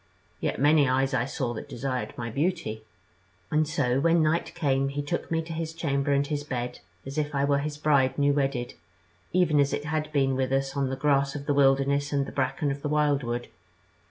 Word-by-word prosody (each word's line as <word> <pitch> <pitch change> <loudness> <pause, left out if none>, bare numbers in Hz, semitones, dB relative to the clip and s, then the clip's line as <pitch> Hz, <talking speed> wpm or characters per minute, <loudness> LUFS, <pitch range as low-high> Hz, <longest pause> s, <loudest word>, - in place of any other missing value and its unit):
Yet - - -2
many 145 -1 +4
eyes 135 +1 +1
I 125 -2 +1
saw 130 -3 -3
that 110 - -7
desired 130 +1 -3
my 115 -1 -4
beauty. 140 -6 -1 0.7
And 155 0 +2
so 140 -5 +1
when 165 +2 +3
night 155 +2 0
came, 135 -2 +1
he 145 +1 -3
took 170 +4 -3
me 165 0 0
to 165 +1 -7
his 160 0 -4
chamber 140 -4 0
and 140 0 +2
his 145 0 -3
bed, 125 -3 -4 0.3
as 135 +3 -3
if 150 -1 -2
I 140 0 +2
were 140 0 +2
his 145 +1 -4
bride 140 -3 +2
new 145 0 +3
wedded, 135 -3 -1 0.6
even 170 -5 +3
as 140 0 +2
it 145 +1 -2
had 155 0 -2
been 135 -3 +2
with 130 0 -1
us 135 +1 0
on 140 -2 0
the 135 - -2
grass 140 0 +1
of 140 -1 -5
the 145 - +1
wilderness 140 +1 +3
and 140 -1 +1
the - - -8
bracken 140 +2 -1
of 140 +1 -5
the 145 - -2
wildwood. 140 -5 0
140 Hz, 215 wpm, -27 LUFS, 135-150 Hz, 0.7 s, many